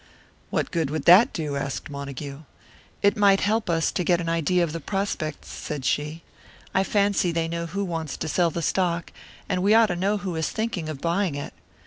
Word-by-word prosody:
"What - - -1
good 165 -5 0
would 155 -1 -3
that 205 +9 +8
do?" 150 -4 -3
asked 135 -1 -3
Montague. 140 0 -6 0.6
"It 200 - +4
might 200 -2 +4
help 215 0 +1
us 165 -1 +1
to 180 - -1
get 175 0 +3
an 165 -1 -2
idea 170 +2 +2
of 160 -3 -2
the 165 - -3
prospects," 175 -3 -3
said 145 -4 -5
she. 150 +5 -1 0.5
"I 190 - +3
fancy 200 -3 +2
they 165 -1 0
know 170 0 -3
who 200 +4 -2
wants 165 -4 -4
to - - -4
sell 170 +2 +2
the 170 +1 -4
stock, 170 -1 0 0.4
and 180 - 0
we 205 +3 +4
ought 225 -1 +6
to - - -3
know 195 +4 +1
who 195 -4 -4
is 160 -1 -1
thinking 220 -8 -3
of 145 -3 -6
buying 170 -1 0
it. 145 - -6
170 Hz, 205 wpm, -25 LUFS, 155-195 Hz, 0.6 s, that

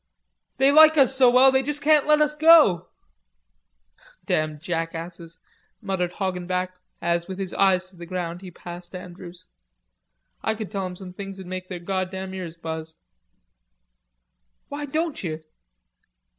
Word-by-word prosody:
"They 270 +1 +4
like 315 +1 +7
us 270 -2 +5
so 260 -2 +6
well 255 +2 +6
they 265 0 +3
just 290 +2 -4
can't 300 -1 +4
let 300 0 +4
us 300 0 +2
go." 300 - +5 1.4
"Damn 155 -1 -1
jackasses," 165 0 -5 0.4
muttered 190 -4 -2
Hoggenback, 185 -1 -2 0.3
as, 170 0 0
with 190 -1 -6
his 190 -2 -5
eyes 185 -1 +2
to 185 - -20
the 170 0 -10
ground, 175 -1 -4
he 190 - -9
passed 175 +1 -10
Andrews. 180 -1 -10 1.0
"I 220 - -1
could 215 -2 -7
tell 195 -3 -2
'em 180 - -8
some 180 -1 -10
things'd 195 0 -8
make 185 0 -6
their 180 - -5
goddam 190 +1 -4
ears 175 -3 -7
buzz." 160 -1 -6 1.7
"Why 290 +1 -5
don't 315 +2 -2
you?" 160 -2 -5
185 Hz, 145 wpm, -24 LUFS, 175-255 Hz, 1.7 s, like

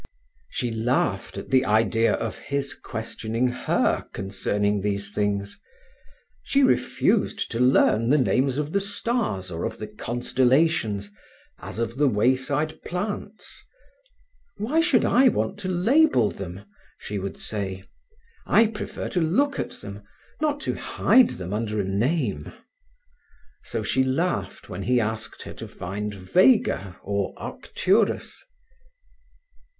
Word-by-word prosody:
She 120 -3 -2
laughed 110 -4 -1
at 100 - -7
the 130 -1 +5
idea 110 +1 +3
of 115 - -4
his 140 -1 -3
questioning 115 0 -3
her 125 - 0
concerning 100 +1 -1
these 100 0 -2
things. 100 - -2 0.8
She 280 0 +2
refused 260 - +1
to 115 - -2
learn 125 -2 +4
the 150 - +5
names 130 0 +2
of 150 0 -2
the 200 - +2
stars 200 - -1
or 85 0 -4
of - - -3
the 110 - -5
constellations, 120 -1 +1 0.5
as - - -8
of 115 +1 -2
the 145 0 +4
wayside 130 +6 +1
plants. 205 +3 -5 0.9
"Why 255 +11 +1
should 280 -8 +3
I 260 +2 +5
want 205 - -2
to 195 - -4
label 185 - +3
them?" 95 +1 -8 0.3
she 105 -1 -5
would 95 0 -5
say. 95 -3 -4 0.6
"I 230 - +6
prefer 215 -1 -5
to 180 - 0
look 265 - +1
at - - -5
them, 100 0 -8 0.4
not 295 -1 0
to - - -1
hide 255 -2 +3
them 90 +1 -5
under 110 0 -2
a - - +1
name." 120 - -1 1.1
So - - -3
she 130 - +2
laughed 130 - -1
when 90 - -6
he 125 +6 +2
asked 110 -1 -3
her - - -8
to - - -8
find 105 +4 -5
Vega 100 - +2
or 100 0 -2
Arcturus. 200 +3 -1
120 Hz, 130 wpm, -25 LUFS, -, 1.1 s, I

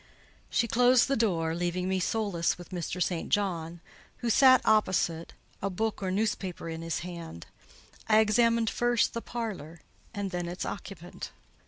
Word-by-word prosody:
She 235 - +1
closed 245 +2 +4
the 275 - +1
door, 170 -9 +1
leaving 175 +1 -1
me 190 0 0
solus 190 -3 0
with 175 - -11
Mr. 180 0 -4
St. 170 -1 -3
John, 175 -4 -1 0.4
who 235 - -1
sat 260 +2 +7
opposite, 185 -6 +1 0.3
a 200 - -1
book 215 +3 -2
or 190 - -1
newspaper 190 -3 -2
in 165 0 -5
his 165 -1 -3
hand. 170 - -8 0.6
I 215 - +6
examined 230 +1 +3
first, 240 -1 +1
the 230 - -3
parlour, 190 -11 -6 0.3
and 200 -3 -4
then 175 -1 -3
its 175 +1 -4
occupant. 180 -3 -7
190 Hz, 155 wpm, -29 LUFS, 170-225 Hz, 0.6 s, sat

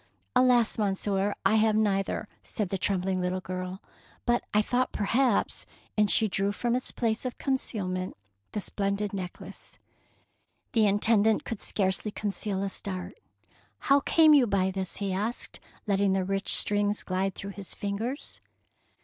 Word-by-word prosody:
'^ - - -34 0.3
"Alas, 250 -3 +4
Monsieur, 200 0 0
I 215 +3 +5
have 215 0 +3
neither,^^ 205 -1 +1 0.2
said 210 -4 -3
the 195 - -2
trembling 185 -1 0
little 180 +1 -1
girl, 185 +1 -5 0.4
"but 240 0 +2
I 210 +1 +3
thought 250 +3 0
perhaps 230 +3 +1
— - - -29
'' - - -43
And 210 -1 +3
she 220 - +5
drew 195 0 0
from 240 +3 0
its 255 - -2
place 225 -2 -1
of 255 -1 -4
concealment 190 - -2 0.4
the 210 - -1
splendid 200 +1 -1
necklace. 190 0 -7 0.9
The 225 -6 +4
Intendant 215 +1 +4
could 230 - -5
scarcely 190 +1 0
con 205 0 -3
ceal 195 -1 -3
a 200 - -1
start. 185 -1 -4 0.4
" - - -33
How 280 - +8
came 315 +2 +5
you 270 -5 +6
by 190 -2 +1
this? 190 -1 -3
he 195 -2 -2
asked, 215 +6 -3 0.3
letting 200 -2 +2
the 190 -1 +1
rich 195 +1 0
strings 205 0 +1
glide 190 +1 -1
through 200 - -6
his 200 -1 -7
fingers. 220 +7 -4
200 Hz, 165 wpm, -28 LUFS, 195-220 Hz, 0.9 s, How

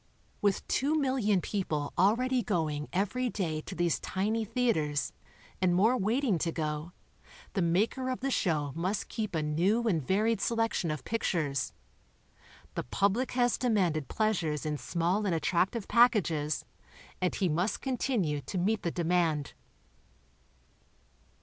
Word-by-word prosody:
With 200 -2 +1
two 290 +4 +1
million 250 -9 +2
people 155 -9 -2
already 245 +7 +3
going 160 -8 -1
every 210 +7 0
day 165 -8 -2
to - - -8
these 175 -1 +1
tiny 215 +4 -1
theaters, 210 - 0 0.5
and 180 -1 +3
more 220 +7 +4
waiting 225 - +1
to 165 - 0
go, 155 +1 -3 0.6
the 195 - 0
maker 205 +10 +1
of 255 - -2
the 275 +1 -1
show 150 - 0
must 185 +6 -2
keep 215 -6 -3
a 155 - 0
new 180 +10 +2
and 170 -7 +2
varied 210 - +1
selection 225 -7 0
of 155 -1 -3
pictures. 165 -11 -1 1.0
The - - -2
public 200 - 0
has 245 -1 +2
demanded 185 - +1
pleasures 175 -9 0
in 150 -1 -2
small 180 +5 0
and 175 - +1
attractive 185 +6 0
pack 240 +1 +6
ages 155 -6 -1 0.6
and 180 - +1
he 190 - +1
must 175 +6 0
continue 235 - 0
to 185 - -5
meet 210 +5 +1
the 170 - -1
demand. 165 -4 0
190 Hz, 140 wpm, -30 LUFS, 160-225 Hz, 1.0 s, pack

